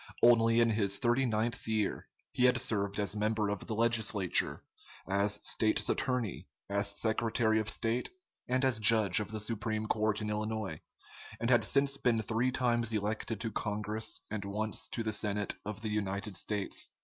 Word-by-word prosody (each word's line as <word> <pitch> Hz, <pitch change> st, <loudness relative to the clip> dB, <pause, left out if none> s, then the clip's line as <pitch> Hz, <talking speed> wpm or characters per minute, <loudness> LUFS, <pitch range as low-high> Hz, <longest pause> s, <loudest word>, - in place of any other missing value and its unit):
Only 115 Hz, -1 st, +5 dB
in 115 Hz, -1 st, +3 dB
his 100 Hz, -2 st, +1 dB
thirty 125 Hz, +2 st, +2 dB
ninth 115 Hz, +1 st, -1 dB
year, 110 Hz, -2 st, -1 dB, 0.3 s
he 125 Hz, -, +2 dB
had 125 Hz, 0 st, +4 dB
served 100 Hz, -4 st, 0 dB
as 100 Hz, 0 st, 0 dB
member 105 Hz, 0 st, 0 dB
of 105 Hz, -1 st, -4 dB
the 110 Hz, -, -3 dB
legislature, 110 Hz, -5 st, +1 dB, 0.4 s
as 100 Hz, +2 st, +1 dB
State's 110 Hz, -1 st, +1 dB
Attorney, 125 Hz, -7 st, -1 dB, 0.2 s
as 100 Hz, 0 st, +1 dB
Secretary 110 Hz, 0 st, +1 dB
of 110 Hz, 0 st, -2 dB
State, 115 Hz, +2 st, -1 dB, 0.4 s
and 130 Hz, +2 st, +1 dB
as 125 Hz, -4 st, +1 dB
judge 110 Hz, -3 st, +5 dB
of 105 Hz, -, -4 dB
the 110 Hz, 0 st, -5 dB
Supreme 110 Hz, 0 st, -2 dB
Court 110 Hz, -1 st, 0 dB
in 105 Hz, -1 st, -3 dB
Illinois, 105 Hz, -5 st, -3 dB, 0.6 s
and 115 Hz, +2 st, 0 dB
had 120 Hz, -, +5 dB
since 140 Hz, 0 st, +2 dB
been 115 Hz, -4 st, +1 dB
three 115 Hz, +4 st, 0 dB
times 120 Hz, -3 st, 0 dB
elected 105 Hz, +1 st, -2 dB
to 115 Hz, -, -3 dB
Congress 105 Hz, +1 st, -3 dB
and 105 Hz, -2 st, -3 dB
once 105 Hz, +2 st, -3 dB
to 115 Hz, -, -4 dB
the 110 Hz, 0 st, -1 dB
Senate 105 Hz, -1 st, 0 dB
of 110 Hz, 0 st, -6 dB
the 110 Hz, -, -3 dB
United 100 Hz, -1 st, -3 dB
States. 100 Hz, +2 st, -2 dB
110 Hz, 170 wpm, -32 LUFS, 105-115 Hz, 0.6 s, Only